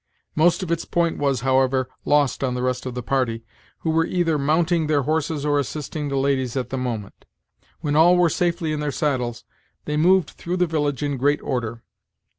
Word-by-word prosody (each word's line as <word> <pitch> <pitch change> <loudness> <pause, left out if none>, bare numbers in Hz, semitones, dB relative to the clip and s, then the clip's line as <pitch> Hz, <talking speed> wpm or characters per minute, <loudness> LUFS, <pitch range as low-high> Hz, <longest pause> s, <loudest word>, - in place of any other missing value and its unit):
Most 175 +3 +3
of 175 - -4
its 170 0 0
point 170 -1 0
was, 140 -4 +1
however, 130 0 +2 0.2
lost 145 -2 +2
on 125 -2 0
the 125 - -2
rest 125 0 -1
of 125 - -5
the 125 - -4
party, 115 -3 -1 0.4
who 160 - 0
were 165 +1 +2
either 165 -4 +1
mounting 160 +3 +2
their 145 -2 +2
horses 155 0 -1
or 145 -1 +2
assisting 145 +2 -4
the 140 - -1
ladies 135 -2 0
at 130 - -3
the - - -1
moment. 115 -6 -5 0.6
When 150 -2 -1
all 175 +3 +6
were 180 -1 +5
safely 170 -1 0
in 150 - -2
their 150 0 -1
saddles, 125 -5 -1 0.4
they 150 0 -1
moved 180 +3 +3
through 175 +2 -4
the 180 - +3
village 150 -4 -1
in 145 -2 -1
great 145 +3 +2
order. 115 -3 -3
145 Hz, 200 wpm, -23 LUFS, 130-160 Hz, 0.6 s, all